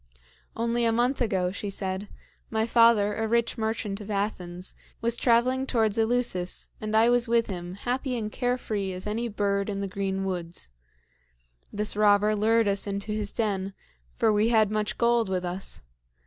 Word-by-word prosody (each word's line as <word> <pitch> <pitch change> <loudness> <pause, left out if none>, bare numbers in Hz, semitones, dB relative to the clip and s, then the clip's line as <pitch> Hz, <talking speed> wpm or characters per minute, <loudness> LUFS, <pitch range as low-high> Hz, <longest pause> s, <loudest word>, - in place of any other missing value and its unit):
"Only 235 +1 0
a 230 - +3
month 245 +4 +1
ago," 190 -6 +1
she 200 +1 -5
said, 190 0 -3 0.4
"my 220 0 0
father, 230 -3 +4
a 225 0 -1
rich 235 +1 +1
merchant 220 -3 -2
of 205 - -9
Athens, 185 -3 -3 0.3
was 230 +1 +1
traveling 255 +3 +2
towards 220 -5 +1
Eleusis, 225 -6 0
and 215 0 0
I 225 +1 +5
was 245 0 +3
with 230 0 +3
him, 180 -2 -6
happy 250 +4 -2
and 215 -2 -3
care 245 +1 0
free 200 -6 -3
as 185 0 -7
any 225 +3 -2
bird 200 -2 -1
in 200 -1 -3
the 200 - -2
green 195 0 -2
woods. 175 - -4 1.0
This 210 0 0
robber 210 0 +4
lured 225 +1 +3
us 200 0 +1
into 200 +1 -3
his 210 -1 -1
den, 195 -3 -2 0.4
for 220 - +3
we 210 +2 +3
had 220 -3 +3
much 215 -1 -1
gold 235 -3 +2
with 185 -1 -1
us. 180 - -4
215 Hz, 175 wpm, -27 LUFS, 195-230 Hz, 1.0 s, I